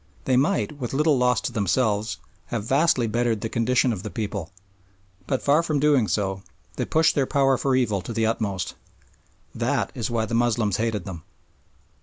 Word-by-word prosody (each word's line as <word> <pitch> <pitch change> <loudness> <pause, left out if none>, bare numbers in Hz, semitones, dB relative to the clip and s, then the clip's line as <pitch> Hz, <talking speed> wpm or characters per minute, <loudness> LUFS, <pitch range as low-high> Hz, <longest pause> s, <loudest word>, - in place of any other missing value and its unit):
They 130 - +2
might, 150 +7 +1
with 125 -2 -4
little 150 -2 +3
loss 125 0 +2
to - - -3
themselves, 105 0 0 0.3
have 115 -3 -3
vastly 135 +1 +2
bettered 115 -1 0
the 115 - -3
condition 120 +2 +2
of 95 - -5
the 105 - -6
people, 100 -6 -4 0.8
but 130 - -1
far 145 +3 +4
from 155 -3 -1
doing 140 -6 +3
so 95 -2 -1 0.3
they - - -2
pushed 160 +1 +3
their 135 -3 +1
power 135 -2 +3
for 130 +1 0
evil 110 -7 +1
to 105 - -7
the 115 -1 0
utmost. 100 -5 -2 0.8
That - - -1
is 115 - -3
why 115 -2 0
the 110 - -6
Moslems 115 -4 +1
hated 110 -4 -1
them. 90 -4 -7
115 Hz, 180 wpm, -24 LUFS, 105-135 Hz, 0.8 s, far